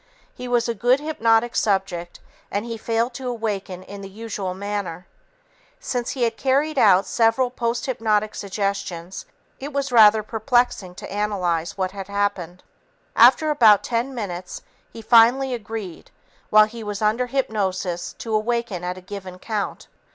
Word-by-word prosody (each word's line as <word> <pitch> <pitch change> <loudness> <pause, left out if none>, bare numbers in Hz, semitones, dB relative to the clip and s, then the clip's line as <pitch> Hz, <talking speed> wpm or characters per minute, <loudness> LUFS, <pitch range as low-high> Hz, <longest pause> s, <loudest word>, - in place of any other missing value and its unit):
He 250 - -8
was 240 -1 +1
a 235 - 0
good 245 +5 +2
hypnotic 235 -6 +1
subject, 190 -4 -1 0.3
and 205 +2 -2
he 230 -1 -4
failed 230 +2 -1
to 260 +1 -6
awaken 205 -6 -4
in 200 +1 -10
the 195 - -8
usual 200 -3 -5
manner. 195 -3 -4 0.7
Since 250 - -3
he 250 - 0
had 230 - 0
carried 280 +2 +1
out 195 -4 +5
several 230 +4 +2
posthypnotic 230 -3 -1
suggestions, 195 -3 -4 0.3
it 280 +2 -6
was 280 -1 -2
rather 215 -2 +6
perplexing 220 -4 0
to - - -9
analyze 185 -6 -1
what 185 -1 -1
had 195 -1 -7
happened. 200 -3 -2 0.5
After 310 -1 +6
about 220 -8 +6
ten 245 +3 -2
minutes, 185 -5 -6 0.3
he 225 - -10
finally 245 +4 +5
agreed 220 -6 -7 0.4
while 215 0 +7
he 225 +1 -9
was 210 0 -4
under 225 +4 +1
hypnosis 195 -9 -2
to 225 - -6
awaken 215 -4 -1
at 180 +1 -3
a - - -10
given 190 -1 -8
count. 210 +1 -4
215 Hz, 150 wpm, -22 LUFS, 195-240 Hz, 0.7 s, while